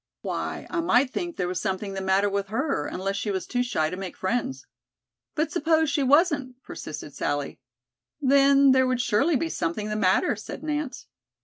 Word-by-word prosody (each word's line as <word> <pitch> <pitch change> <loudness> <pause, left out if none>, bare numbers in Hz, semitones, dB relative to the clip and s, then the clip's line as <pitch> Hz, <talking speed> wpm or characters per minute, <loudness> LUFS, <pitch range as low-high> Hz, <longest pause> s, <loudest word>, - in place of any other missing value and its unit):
"Why, - - -4
I 345 - -1
might 260 -4 +3
think 350 +1 -3
there 180 - -1
was 180 0 -2
something 195 +1 -2
the 190 - -4
matter 190 +1 +2
with 200 0 -1
her, 225 - -1
unless 195 +1 -3
she 210 - -2
was 190 -2 -2
too 245 - -1
shy 155 -11 0
to - - -3
make 190 -1 -7
friends." 185 - -2 0.7
"But 310 +1 0
suppose 320 0 +2
she 290 - +1
wasn't?" 280 -2 +2
persisted 150 -1 -8
Sally. 145 -1 -2 0.6
"Then, 275 0 +5
there 260 0 +4
would 255 -1 0
surely 245 +7 +2
be 325 +4 0
something 205 - -2
the 210 - -2
matter," 195 +2 +2
said 215 +7 -8
Nance. 300 -3 -3
245 Hz, 185 wpm, -26 LUFS, 190-280 Hz, 0.7 s, Then